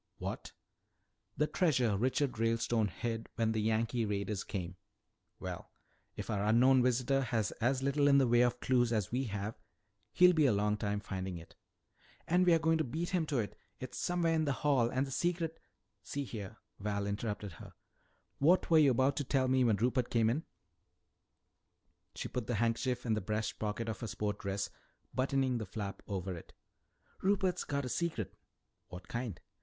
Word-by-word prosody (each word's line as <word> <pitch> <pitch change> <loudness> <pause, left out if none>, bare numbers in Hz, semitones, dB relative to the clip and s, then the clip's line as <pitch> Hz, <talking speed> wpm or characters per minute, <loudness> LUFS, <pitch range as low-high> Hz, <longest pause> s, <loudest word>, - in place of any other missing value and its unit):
"What?" - - -5 0.9
"The 150 - +3
treasure 130 - +2
Richard 125 +3 0
Ralestone 115 -1 +1
hid 115 +2 -4
when 115 -1 +1
the 110 -1 0
Yankee 115 +2 +1
raiders 100 -1 -2
came." 95 -2 -5 0.6
"Well, - - -6 0.5
if - - -6
our 100 -2 0
unknown 125 +5 +5
visitor 125 +2 +2
has 115 -5 0
as 130 +3 +1
little 140 +1 +2
in 140 -1 +6
the 135 -2 +4
way 120 0 +5
of 120 0 +2
clues 120 -2 +2
as 105 -5 0
we 130 +3 0
have, 100 0 -4 0.5
he'll 180 0 +6
be 155 -4 +4
a 125 - +4
long 105 +1 +1
time 105 -1 -2
finding 95 -2 -4
it." 80 - -13 0.7
"And 180 +2 +3
we're 170 -2 +7
going 160 0 +2
to - - +2
beat 160 +7 -3
him 175 -4 0
to 145 - 0
it! 110 -4 -2 0.2
It's 130 -1 -6
somewhere 175 -2 +1
in 160 -1 +2
the 140 - +1
Hall, 130 -5 +4
and 130 +3 0
the 135 - -8
secret 165 +1 -1 0.2
" 105 +1 -50
"See 140 +7 -4
here," 110 -4 -7 0.2
Val 100 0 -2
interrupted 105 0 -3
her, - - -11 0.7
"what 170 +5 +4
were 160 - +7
you 145 -3 +6
about 130 +2 +3
to 145 - 0
tell 130 -1 +1
me 130 0 +3
when 115 -3 +4
Rupert 120 +3 +1
came 115 -1 +3
in?" 150 +7 -2 1.7
She - - -4
put 125 -3 -4
the 120 - 0
handkerchief 120 +3 0
in 115 - +1
the 110 - 0
breast 110 +3 -2
pocket 110 +2 -2
of 110 - -3
her 115 - -4
sport 105 -1 -3
dress, 100 0 -3 0.4
buttoning 130 -1 +1
the 110 - -4
flap 100 0 -5
over 95 -2 -3
it. 85 - -12 0.7
"Rupert's 190 -2 +1
got 140 -1 -2
a - - -3
secret." 155 - -2 0.5
"What 90 0 -10
kind?" 120 -6 -4
120 Hz, 180 wpm, -33 LUFS, 105-140 Hz, 1.7 s, we're